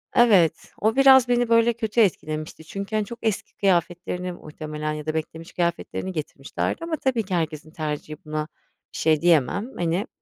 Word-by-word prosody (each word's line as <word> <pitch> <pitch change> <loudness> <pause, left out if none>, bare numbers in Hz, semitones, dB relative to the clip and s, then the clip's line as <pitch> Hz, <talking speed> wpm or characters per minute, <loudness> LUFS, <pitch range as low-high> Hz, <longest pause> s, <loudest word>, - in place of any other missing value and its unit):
Evet, 190 -10 +4
o 220 +2 +2
biraz 265 -2 +7
beni, 245 -1 +2
böyle, 230 0 +4
kötü 225 0 0
etkilemişti 155 -6 -1
çünkü, 200 +6 -5
hani, 215 -1 +1
çok 235 +3 -9
eski 220 -3 -2
kıyafetlerini 180 -1 0
muhtemelen 155 -2 -5
ya 150 0 -6
da 155 - -1
beklemiş 160 +1 -5
kıyafetlerini 175 +2 -2
getirmişlerdi 155 - -4
ama 335 -1 -1
tabii 250 -5 0
ki 185 -2 -3
herkesin 155 -2 -3
tercihi 155 -1 -4
buna 155 0 -3 0.5
bir - - -7
şey 155 -2 +2
diyemem. 175 - +2
Hani, 175 +5 0
175 Hz, 165 wpm, -24 LUFS, 155-220 Hz, 0.5 s, biraz